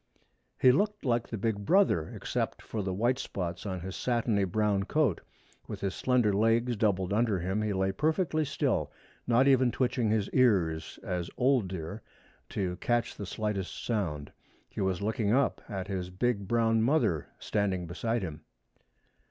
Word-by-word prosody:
He 130 - +7
looked 205 +6 0
like 120 -2 +1
the 115 - -5
big 105 0 -1
brother, 170 - +3
except - - -3
for 110 - -4
the 95 -1 -2
white 120 +7 +1
spots 90 +1 -4
on 95 -2 -3
his 95 +1 -6
satiny 115 -5 +1
brown 105 +1 +1
coat. 145 - +1 0.5
With - - -6
his 95 -1 -1
slender 125 -5 +2
legs 115 +4 +2
doubled 100 -3 +1
under 110 -2 +2
him 95 +4 -1
he 105 -1 -1
lay 95 0 +1
perfectly 155 - +1
still, 140 -1 -1 0.4
not 125 +3 +4
even 130 -2 +4
twitching 120 -1 0
his 105 -2 +1
ears, 90 -11 +2
as 90 -2 -3
old 125 -5 +3
deer 90 +3 -6 0.5
to 90 -3 -2
catch 120 +3 0
the 100 - -6
slightest 100 -1 -3
sound. 85 -11 -2 0.4
He - - -6
was 95 0 0
looking 110 0 0
up 140 +2 +2
at 95 -2 -4
his 95 -2 -3
big 100 +1 -1
brown 115 0 +2
mother 115 - +2
standing 95 -4 -1
beside 115 +6 -2
him. 80 -3 -6
105 Hz, 160 wpm, -30 LUFS, 95-120 Hz, 0.5 s, He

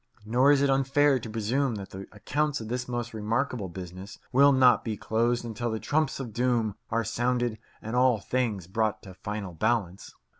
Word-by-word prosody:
Nor 125 +6 +4
is 140 -1 +4
it 140 - +3
unfair 135 +1 +3
to 115 - -8
presume 115 +4 0
that 100 -2 -7
the 95 +1 -8
accounts 145 +8 -1
of 110 -1 -7
this 125 +1 -3
most 120 -1 -4
remarkable 110 0 -1
business 90 +3 -9
will 140 +3 +6
not 130 -2 +5
be 110 -2 -3
closed 120 +3 0
until 115 +1 -3
the 110 0 -2
Trumps 150 +1 0
of 120 -5 -6
Doom 120 -3 +1 0.2
are 115 +1 0
sounded 120 0 -1 0.2
and 110 +2 -4
all 125 -2 +4
things 110 -4 -1
brought 110 +3 -1
to 95 - -10
final 100 -1 -5
balance. 100 0 -1
115 Hz, 185 wpm, -27 LUFS, 105-130 Hz, 0.2 s, will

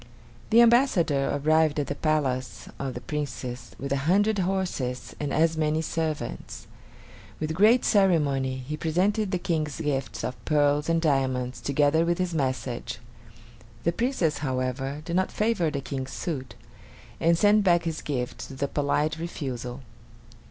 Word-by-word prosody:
The 230 +1 +7
ambassador 225 - +4
arrived 155 +1 +2
at 145 - 0
the - - -3
palace 140 -5 -1
of 135 -2 -3
the 125 - -5
Princess 125 -2 -5
with 140 0 -5
a 140 - +2
hundred 205 +3 +3
horses 175 -10 -2
and 145 -2 -2
as 160 +1 +2
many 155 0 +1
servants. 155 - -4 0.7
With 155 0 -2
great 215 +8 +5
ceremony, 145 -10 +2
he 150 - -2
presented 190 +7 +1
the 185 - 0
King's 155 -4 -2
gifts 140 -3 -2
of 125 - -5
pearls 145 0 +2
and 165 0 +3
diamonds, 130 -5 0
together 145 +3 +2
with 170 0 +1
his 180 -2 -1
message. 130 -5 -2 0.9
The 170 - +2
Princess, 210 - 0
however, 135 +1 -2
did 170 - -3
not 185 +1 +1
favor 210 -7 +1
the 140 -2 -3
King's 135 -1 -5
suit, 135 -7 -4 0.6
and 165 +1 +3
sent 205 +2 +4
back 175 -3 +4
his 165 -2 -3
gifts 125 -4 -4
with 135 0 -5
a - - +1
polite 150 +2 0
refusal. 130 -6 -5
150 Hz, 150 wpm, -26 LUFS, 135-170 Hz, 0.9 s, The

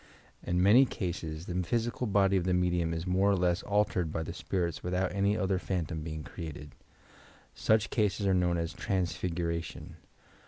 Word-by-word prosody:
In 90 +1 0
many 110 +7 +7
cases 85 -5 -4
the 90 - -5
physical 120 +6 -1
body 100 -1 +3
of 95 - +2
the 90 -1 +2
medium 90 -2 +1
is 80 +1 -3
more 95 +2 +2
or 100 - +4
less 90 0 +1
altered 100 -5 0
by 80 - -2
the - - -6
spirits 85 -4 -2
without 90 +1 -1
any 100 +2 +1
other 95 -1 0
phantom 85 -4 -3
being 80 -1 -5
created. 75 -4 -8 0.8
Such 110 0 +2
cases 105 -2 +1
are 95 - +3
known 90 -1 +2
as 85 0 -2
"transfiguration." 85 -3 -3
90 Hz, 165 wpm, -30 LUFS, 85-100 Hz, 0.8 s, many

